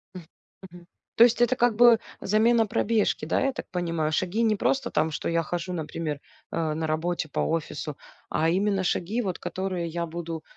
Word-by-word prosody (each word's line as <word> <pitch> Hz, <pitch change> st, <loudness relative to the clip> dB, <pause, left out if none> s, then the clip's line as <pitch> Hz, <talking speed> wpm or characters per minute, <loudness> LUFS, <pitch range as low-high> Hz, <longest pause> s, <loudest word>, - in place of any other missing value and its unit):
М, 180 Hz, -3 st, -8 dB, 0.5 s
мгм. 175 Hz, 0 st, -14 dB, 0.3 s
То 230 Hz, -, +8 dB
есть 240 Hz, 0 st, +1 dB
это 255 Hz, +1 st, +4 dB
как 240 Hz, -2 st, +2 dB
бы 235 Hz, 0 st, +7 dB, 0.2 s
замена 225 Hz, +3 st, +3 dB
пробежки, 215 Hz, -6 st, +1 dB
да, 160 Hz, -, 0 dB
я 270 Hz, -, +2 dB
так -, -, -7 dB
понимаю. 165 Hz, -4 st, -1 dB
Шаги 185 Hz, +7 st, 0 dB
не 215 Hz, -2 st, +3 dB
просто 260 Hz, +4 st, 0 dB
там, 155 Hz, +1 st, +1 dB
что -, -, -3 dB
я 165 Hz, 0 st, +1 dB
хожу, 175 Hz, +3 st, -4 dB
например, 155 Hz, -2 st, -4 dB, 0.3 s
э, 160 Hz, -2 st, -1 dB
на 160 Hz, 0 st, -2 dB
работе 160 Hz, +1 st, -1 dB
по -, -, -3 dB
офису, 155 Hz, -2 st, -3 dB, 0.3 s
а 160 Hz, +1 st, +1 dB
именно 195 Hz, +2 st, +1 dB
шаги, 195 Hz, +6 st, 0 dB
вот 190 Hz, -6 st, -3 dB
которые 185 Hz, -3 st, -3 dB
я 170 Hz, +1 st, -3 dB
буду, 165 Hz, -1 st, -6 dB
175 Hz, 185 wpm, -26 LUFS, 165-215 Hz, 0.5 s, То